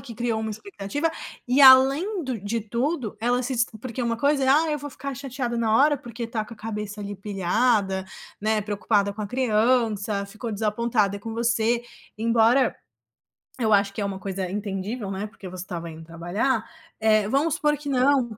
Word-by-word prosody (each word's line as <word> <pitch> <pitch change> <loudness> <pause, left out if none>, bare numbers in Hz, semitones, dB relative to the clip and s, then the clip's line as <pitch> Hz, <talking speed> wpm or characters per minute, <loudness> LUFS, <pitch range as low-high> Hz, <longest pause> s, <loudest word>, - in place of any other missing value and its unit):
que 235 -4 -10
criou 235 -2 -1
uma 220 - -3
expectativa. 290 - -3 0.4
E 255 +3 +3
além 275 +8 +6
do 255 -4 -3
de 210 +4 -2
tudo, 235 +1 -2
ela 245 +2 +1
se 260 +1 -2
des 235 0 +3 0.2
porque 255 0 -4
uma 230 -1 0
coisa 280 +2 +2
é: 260 - +1
"Ah, 310 +3 +4
eu 300 - -1
vou 290 +1 -6
ficar 275 +1 -6
chateada 255 -3 -4
na 225 -1 +2
hora", 290 +1 +5
porque 235 -1 -6
tá 225 -2 -2
com 230 - -11
a - - -23
cabeça 210 -1 -5
ali 200 0 -5
pilhada, 195 0 +1 0.4
né, 215 0 +1
preocupada 205 0 0
com 215 - -9
a - - -3
criança, 220 -3 +1
ficou 220 +3 -6
desapontada 210 -1 0
com 225 +2 -6
você. 235 0 +1 0.4
Embora 230 +3 +3 0.9
eu 220 -2 +2
acho 200 0 +3
que - - -6
é - - 0
uma 195 -1 -4
coisa 190 -1 -3
entendível, 200 +2 -4
né, 195 +2 -3
porque 195 -3 -11
você 180 0 -7
estava 170 -2 -6
indo 160 0 -10
trabalhar. 190 +9 -1 0.4
Eh, 215 -2 +3
vamos 280 +6 +1
supor 295 -1 +2
que 290 -1 -6
não. 255 -4 +2
225 Hz, 190 wpm, -25 LUFS, 205-255 Hz, 0.9 s, além